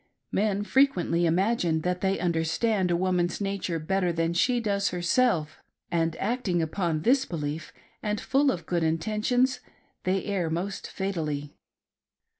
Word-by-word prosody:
Men 205 0 +1
frequently 185 -10 +2
imagine 175 -2 +1
that 180 +2 -1
they 195 0 +1
understand 175 +4 +1
a 175 - +2
woman's 180 -1 0
nature 195 -4 -2
better 180 +3 0
than 165 0 0
she 245 +8 +2
does 200 -3 0
herself, 175 -3 +1 0.3
and 165 -1 +1
acting 210 -5 -1
upon 160 -1 -1
this 260 +5 +4
belief, 155 - -4 0.3
and 210 -1 -1
full 275 +1 +2
of 170 -3 -5
good 175 0 0
intentions, 215 +11 +1 0.4
they 185 0 0
err 190 -5 -1
most 180 +5 -3
fatally. 155 -7 -3
180 Hz, 135 wpm, -27 LUFS, 165-205 Hz, 0.4 s, this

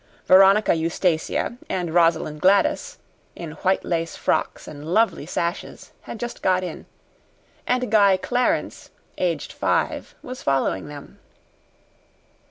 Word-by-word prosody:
Veronica 195 +3 +6
Eustacia 165 +6 -1
and 175 -3 -2
Rosalind 165 -3 +2
Gladys, 200 - +2 0.4
in 170 -3 -7
white 190 0 +1
lace 165 -1 -2
frocks - - -1
and 145 -1 -9
lovely 220 -9 +1
sashes, 170 +1 -4
had 225 - -9
just 240 0 -6
got 185 0 +2
in, 180 - -7 0.8
and 250 -2 0
Guy 200 -3 +5
Clarence, 245 +6 -1 0.3
aged - - -2
five, - - -1
was 255 0 -8
following 135 -7 0
them. 145 -1 -11
185 Hz, 115 wpm, -23 LUFS, 165-215 Hz, 0.8 s, Veronica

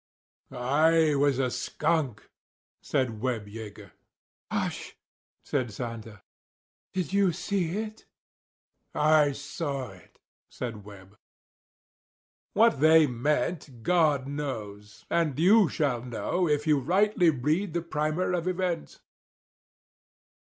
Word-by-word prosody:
"I 150 +5 +3
was 140 -2 +2
a 130 -2 0
skunk," 150 -5 -2 0.5
said 115 -5 -1
Webb 120 -4 -2
Yeager. 105 -2 -10 0.6
"Hush," - - -3 0.5
said 125 -5 -1
Santa, 115 -2 -7 0.7
"did 185 -2 -3
you 200 -2 +3
see 180 +1 -2
it?" 215 0 -6 0.9
"I 150 -1 +4
saw 140 -2 -4
it," 90 -2 -18 0.3
said 115 -5 -6
Webb. 100 0 -14 1.3
What 215 - +4
they 160 +1 +6
meant 140 0 -2
God 155 -7 +2
knows; 110 -8 -6
and 165 -6 +1
you 190 +3 +5
shall 135 -6 0
know, 125 +9 -1
if 150 0 +1
you 150 -2 +3
rightly 185 +4 +3
read 155 +7 0
the 170 - -1
primer 155 +3 -1
of 175 0 -1
events. 180 -2 -2
150 Hz, 105 wpm, -27 LUFS, 120-170 Hz, 1.3 s, they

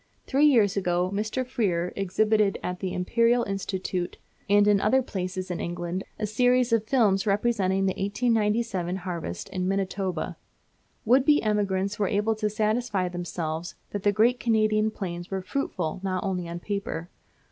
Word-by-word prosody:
Three 285 +3 +4
years 220 -9 +4
ago 180 -1 0
Mr. 215 +5 -1
Freer 190 -9 -1
exhibited 210 +1 +2
at 180 0 -3
the 190 -2 -3
Imperial 230 +7 +2
Institute 190 -2 -3 0.3
and 205 0 +5
in 205 -1 +4
other 260 +5 +3
places 185 -3 -4
in 175 - -3
England 175 +2 -3
a 215 - -1
series 245 +3 +2
of 225 -1 +2
films 215 -6 +2
representing 195 -2 +1
the 190 - +1
1897 210 -3 0
harvest 175 - -5
in 185 -1 -2
Manitoba. 195 -1 -2 0.7
Would 255 +4 +5
be 295 +1 +4
emigrants 200 -1 0
were 205 - +2
able 210 +3 +1
to 215 -1 0
satisfy 215 -3 0
themselves 175 -2 -4 0.2
that 205 - -3
the 205 - +3
great 230 +4 +3
Canadian 215 -2 +2
plains 175 -4 -6
were 190 -1 -3
fruitful 185 - -3
not 185 -1 -2
only 180 -3 -2
on 170 0 -5
paper. 200 -4 -4
200 Hz, 155 wpm, -26 LUFS, 185-220 Hz, 0.7 s, and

